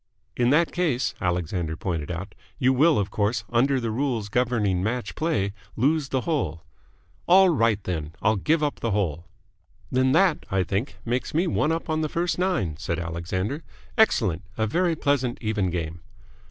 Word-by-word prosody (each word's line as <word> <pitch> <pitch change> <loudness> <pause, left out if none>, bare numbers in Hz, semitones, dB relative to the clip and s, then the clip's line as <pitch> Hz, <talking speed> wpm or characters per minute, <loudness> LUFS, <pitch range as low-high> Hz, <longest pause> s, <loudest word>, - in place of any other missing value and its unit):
"In 120 0 +2
that 160 +5 +3
case," 135 -9 0
Alexander 85 -2 -1
pointed 85 -6 -3
out, 90 +3 -5 0.2
"you 130 +1 +3
will, 155 +5 +4
of 100 -1 -1
course, 105 +2 0
under 130 +3 +3
the 115 -2 -2
rules 120 -4 -1
governing 110 -6 +1
match 120 +5 -2
play, 105 -12 0 0.2
lose 140 +4 +1
the 130 -1 0
hole." 90 - -2 0.6
"All 190 +1 +7
right, 115 - +2
then. 80 -3 -4
I'll 110 - +2
give 155 - +1
up 145 - -1
the 115 - -1
hole." 85 -6 -1 0.6
"Then 130 +1 +3
that, 170 -1 +3
I 95 -1 +1
think, 100 +9 -3
makes 125 +5 -2
me 170 +4 +3
one 160 -2 +1
up 165 0 -2
on 155 -1 0
the 155 - -1
first 175 +2 -1
nine," 110 - 0
said 85 +1 -3
Alexander. 90 - -3 0.3
"Excellent! 110 - +3 0.2
A 110 - +1
very 170 - +1
pleasant, 135 -5 0
even 105 -4 0
game." 85 -1 -4
115 Hz, 170 wpm, -25 LUFS, 95-150 Hz, 0.6 s, All